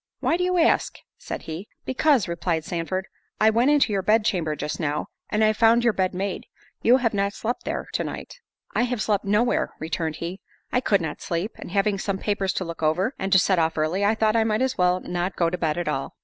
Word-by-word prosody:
"Why 325 - +1
do 360 - 0
you 365 0 +1
ask!" 335 - +2 0.2
said - - -6
he. 165 +6 -6 0.2
"Because," 260 -4 +2
replied 170 -1 -2
Sandford, 180 +3 -3 0.3
"I 220 +1 +5
went 235 +5 +3
into 285 -7 +3
your 195 - +1
bed 215 +2 +3
chamber 160 -7 0
just 150 - -4
now, 150 -2 -2 0.2
and 215 +1 +1
I 215 0 +4
found 230 +2 +4
your 235 -2 +3
bed 185 -2 0
made. 195 0 -3 0.3
You 245 +3 +5
have 235 -4 0
not 200 0 0
slept 240 +3 -3
there - - -3
to - - 0
night." - - -7 0.3
"I - - +2
have 245 -1 -1
slept 205 -2 0
no 210 +3 +3
where," 245 - 0
returned 160 0 -2
he; 175 +4 -6 0.3
"I 250 - +2
could 200 -6 +2
not 155 -3 -5
sleep—and 175 +5 -4
having 195 +1 +1
some 195 0 -2
papers 200 -2 -1
to 185 - -2
look 170 -1 -7
over, 180 - +1
and 195 0 -2
to 190 - +7
set 190 -1 +3
off 160 0 +1
early, 160 +6 0
I 210 +2 +3
thought 220 0 +2
I 225 - +4
might 220 +2 +1
as 260 0 0
well 180 0 +2
not 180 +1 -3
go 170 -1 +1
to 180 - -2
bed 155 -1 0
at 175 - -2
all." 135 -3 -3
195 Hz, 235 wpm, -24 LUFS, 170-225 Hz, 0.3 s, to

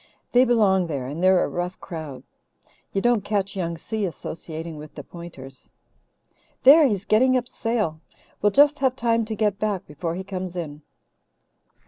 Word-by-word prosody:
"They 250 +1 +5
belong 200 -7 +3
there 140 -5 -3
and 145 +6 -5
they're 185 0 +5
a - - 0
rough 175 +1 -4
crowd. 155 -6 -7 0.7
You 195 - -1
don't 240 -4 +3
catch 200 -1 -1
Young 170 -3 -3
Si 215 +6 -4
associating 165 -2 -6
with 150 0 -11
the - - -7
Pointers. 140 -7 -11 0.9
There, 290 +3 +8
he's 205 -5 -2
getting 255 +4 +4
up 245 -1 -3
sail. 220 -11 -2 0.4
We'll 205 - +3
just 290 +5 +5
have 260 -2 +2
time 230 -2 +1
to 220 0 -4
get 210 -2 0
back 205 -3 -1
before 165 +3 -4
he 190 - -5
comes 185 -2 -5
in." 155 -4 -5
190 Hz, 165 wpm, -24 LUFS, 165-225 Hz, 0.9 s, There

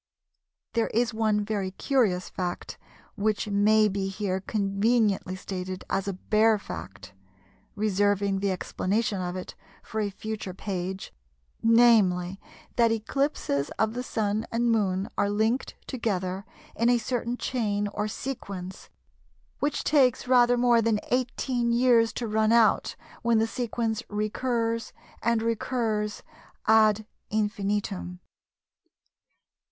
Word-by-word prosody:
There 230 - +1
is 235 +1 0
one 215 -2 +1
very 205 -3 -2
curious 195 -3 +1
fact 180 -1 -5 0.4
which 215 +1 0
may 210 +1 +4
be 195 -1 -2
here 195 -1 -2
conveniently 200 -1 +1
stated 185 0 -5
as 195 - 0
a 200 - -1
bare 215 +3 +3
fact, 100 - -9 0.6
reserving 200 -1 +1
the 200 0 0
explanation 200 +2 -1
of 180 0 -3
it 185 - -6 0.3
for 220 - -3
a 205 - 0
future 205 -2 -6
page, 190 - -4 0.5
namely, 210 -6 +4 0.4
that 230 -1 +4
eclipses 225 - -1
of 220 0 +1
the 245 - -3
Sun 215 -2 -1
and 235 +1 +1
Moon 195 -3 +1
are 200 - +2
linked 220 +5 0
together 195 -5 -2 0.3
in 230 +2 +2
a 245 - +5
certain 240 +1 -2
chain 210 -6 -1
or 210 +1 -2
sequence 200 -6 -6 0.7
which 290 +2 -1
takes 260 -5 +3
rather 245 -1 +5
more 240 -1 +4
than 225 -2 +1
18 245 -1 0
years 235 -1 +4
to 235 - -3
run 215 0 +2
out 230 -2 +3 0.3
when 235 -1 +3
the 220 - +3
sequence 230 -2 -2
recurs 230 +2 -1 0.3
and 235 -1 +1
recurs 225 -2 -1 0.4
ad 215 -1 +4 0.2
infinitum. 205 -4 -2
215 Hz, 120 wpm, -27 LUFS, 195-230 Hz, 0.7 s, a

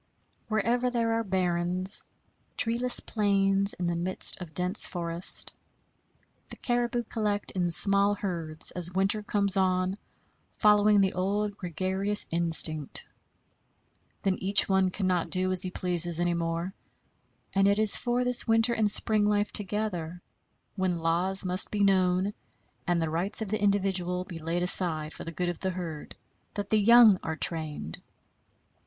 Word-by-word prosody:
Wherever 235 +3 0
there 230 -2 -1
are 225 0 -1
barrens 185 0 -1 0.5
treeless 240 +2 +2
plains 200 -2 0
in 180 - -5
the 170 0 -1
midst 180 +2 0
of 160 -4 -10
dense 180 +3 +2
forest 170 0 +2 1.0
the - - -9
caribou 240 -1 -2
collect 210 -3 -3
in 180 -2 -2
small 200 +4 +3
herds 170 -6 -3
as 180 -1 -3
winter 195 +3 0
comes 205 -1 -1
on, 185 +1 0 0.6
following 210 -1 +4
the 190 -1 0
old 200 +2 -2
gregarious 190 +3 -1
instinct. 160 -3 +1 1.2
Then 190 -2 -1
each 195 +2 +3
one 190 -1 +1
cannot 185 -2 -2
do 185 0 +1
as 185 -1 -1
he 185 - -3
pleases 175 -2 0
any 175 0 0
more; 170 +2 -4 0.8
and 195 0 +2
it 200 0 +2
is 215 -1 +9
for 245 0 0
this 250 0 +1
winter 225 +1 +2
and 215 -2 +1
spring 210 0 +2
life 210 0 0
together, 185 -5 -1 0.6
when 185 -3 -1
laws 175 +4 -1
must 185 +1 -1
be 205 -1 -1
known, 190 0 +1 0.5
and 175 -1 +1
the 160 -1 -2
rights 175 +6 -2
of 210 - -8
the 215 +1 -3
individual 190 -3 -1
be 175 -2 -10
laid 165 +2 -3
aside 160 -4 +3
for - - -10
the 165 - -6
good 175 +1 -3
of 175 - -6
the 190 - -3
herd, 170 -5 -7 0.4
that 205 -1 -5
the 215 - +3
young 225 -2 +6
are 160 - -5
trained. 155 - -3
190 Hz, 150 wpm, -27 LUFS, 175-205 Hz, 1.2 s, is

